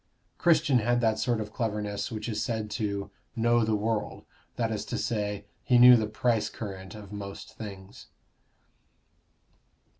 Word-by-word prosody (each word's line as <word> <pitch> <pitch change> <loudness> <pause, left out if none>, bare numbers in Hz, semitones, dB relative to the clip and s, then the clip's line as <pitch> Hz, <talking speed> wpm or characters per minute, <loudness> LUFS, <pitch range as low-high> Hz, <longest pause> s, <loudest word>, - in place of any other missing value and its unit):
Christian 155 -6 +4
had 120 +2 +2
that 110 -2 +2
sort 120 -3 +1
of 105 0 -5
cleverness 105 -2 -2
which 110 0 -4
is 110 -3 -2
said 110 -4 -2
to 100 -1 -3 0.2
"know 120 0 +3
the 110 0 +1
world" 110 +1 -2 0.3
that 115 -2 -1
is 105 -2 -2
to - - -3
say, 105 -2 -2 0.2
he 125 - +4
knew 125 +1 +10
the 110 -2 +1
price 110 +1 0
current 95 -2 -7
of 105 -2 -10
most 100 -1 -7
things. 100 -3 -9
110 Hz, 150 wpm, -28 LUFS, 105-120 Hz, 0.3 s, knew